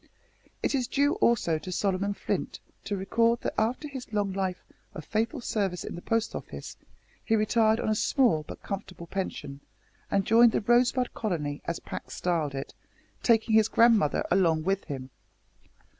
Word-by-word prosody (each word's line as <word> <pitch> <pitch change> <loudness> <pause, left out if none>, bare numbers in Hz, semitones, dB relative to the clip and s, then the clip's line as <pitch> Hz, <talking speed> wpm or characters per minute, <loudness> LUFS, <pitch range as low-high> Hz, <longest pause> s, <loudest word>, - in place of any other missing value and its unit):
It - - +1
is 255 -3 0
due, 285 +2 +2
also, 220 - +2
to 185 - -7
Solomon 195 +2 0
Flint - - -3 0.3
to 205 - -2
record 230 +5 +2
that - - -2
after 240 +7 0
his 265 -5 -8
long 205 -2 0
life 190 -2 -2 0.3
of 155 - -7
faithful 230 +6 -1
service 195 -6 -1
in - - -6
the 175 - -7
Post 225 +2 0
Office - - -7 0.5
he 225 - +2
retired 220 +1 +3
on - - -2
a 215 - +3
small 225 - +2
but - - -9
comfortable 190 -4 -6
pension, 150 -6 -5 0.5
and 195 -1 +1
joined 230 0 +6
the - - +1
"Rosebud 245 +3 +2
Colony," 150 -9 -3
as 170 - -2
Pax - - -7
styled 160 -6 -1
it, 135 - -5 0.5
taking 225 -1 +3
his 220 -1 +6
grandmother 225 -9 +4
along 165 -4 +3
with 195 +2 0
him. 135 -3 -6
205 Hz, 165 wpm, -28 LUFS, 180-230 Hz, 0.5 s, joined